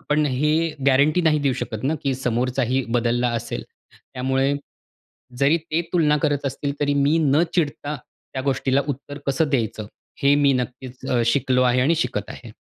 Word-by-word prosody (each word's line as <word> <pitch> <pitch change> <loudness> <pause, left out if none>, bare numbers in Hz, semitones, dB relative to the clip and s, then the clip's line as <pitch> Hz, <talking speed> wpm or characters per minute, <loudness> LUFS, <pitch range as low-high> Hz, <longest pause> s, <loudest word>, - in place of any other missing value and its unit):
आपण 150 0 +1
हे 145 +3 +1 0.3
गॅरंटी 145 +6 +4
नाही 155 -2 +3
देऊ 140 -2 +1
शकत 110 -1 -5
ना, 155 +4 +1
की 135 -2 0
समोरचाही 125 +1 0
बदलला 120 +1 +1
असेल. - - -5 0.3
त्यामुळे 135 +2 -1 0.8
जरी 140 +4 +4
ते 160 +1 -2
तुलना 150 -4 +3
करत 145 -1 0
असतील 140 +1 -3
तरी, 145 0 +1
मी 145 +3 +3
न 150 +1 +3
चिडता 150 -3 -1 0.4
त्या 130 - -2
गोष्टीला 135 0 +1
उत्तर 145 +1 -5
कसं 145 +3 +1
द्यायचं? 110 -5 -1 0.4
हे 140 +1 +5
मी 140 -1 +4
नक्कीच 125 +1 -5
अ, 120 -2 +2
शिकलो 130 +1 +2
आहे 125 0 +3
आणि 155 +6 +3
शिकत 120 - -2
आहे. 120 - -10
140 Hz, 165 wpm, -22 LUFS, 125-145 Hz, 0.8 s, हे